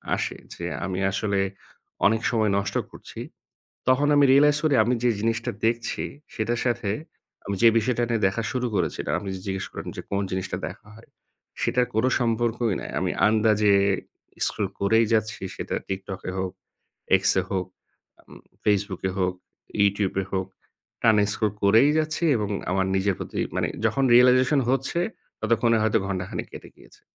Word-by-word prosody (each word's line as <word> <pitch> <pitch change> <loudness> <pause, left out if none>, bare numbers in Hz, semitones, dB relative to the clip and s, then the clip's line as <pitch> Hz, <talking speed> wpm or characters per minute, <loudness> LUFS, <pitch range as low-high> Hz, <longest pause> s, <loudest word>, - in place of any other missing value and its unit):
আসে। - - -3 0.2
যে 85 - -6 0.2
আমি 95 0 -3
আসলে 100 0 -1 0.7
অনেক 110 +2 +1
সময় 110 -3 +2
নষ্ট 100 0 -2 0.2
করছি - - -11 0.7
তখন 130 +3 +4
আমি 145 - +6
realize 145 +2 +5
করি 155 -3 +3
আমি 120 +3 +1
যে 120 - +4
জিনিসটা 115 +2 -1 0.2
দেখছি, 115 0 -1 0.3
সেটার 115 +2 -1
সাথে 120 -4 0 0.6
আমি 100 - -2
যে 115 - +9
বিষয়টা 120 +1 0
নিয়ে 115 -2 0
দেখা 100 +4 -3
শুরু 125 -1 -1
করেছিলাম, 85 -5 -1 0.2
যে 95 - -7
জিজ্ঞেস 95 -1 -3
করলেন - - -6
যে - - -4
কোন 100 - 0
জিনিসটা 95 0 -2
দেখা - - -13
হয়? 115 - -17 0.5
সেটার 125 -1 +2
কোন 110 +2 +2 0.2
সম্পর্কই 115 -2 0
নাই। - - -7
আমি - - 0 0.2
আন্দাজে 105 -1 +3 0.7
scroll 105 -3 -2
করেই 110 +3 +3
যাচ্ছি 110 -2 0
সেটা - - -4
TikTok-এ 95 -1 -5
হোক, 95 -1 -2 0.7
X-এ 95 - +3
হোক 95 -2 -1 0.5
আম - - -23 0.3
Facebook-এ 100 -2 0
হোক, 90 -1 +1 0.5
YouTube-এ 100 -1 +1
হোক 95 -1 -1 0.5
টানা 110 -2 +5
scroll 105 -1 -1
করেই 110 +8 +6
যাচ্ছি 155 +2 -1
এবং 105 -2 -2 0.2
আমার 95 0 +1
নিজের 95 0 +1
প্রতি - - -5 0.2
মানে - - +1 0.2
যখন 135 - +1
realization 130 +3 +5
হচ্ছে 135 +5 0 0.4
ততক্ষণে 115 +1 +2
হয়তো 110 0 +3
ঘণ্টাখানেক 95 -1 -4
কেটে - - -10
গিয়েছে। - - -20
110 Hz, 150 wpm, -25 LUFS, 100-120 Hz, 0.7 s, যে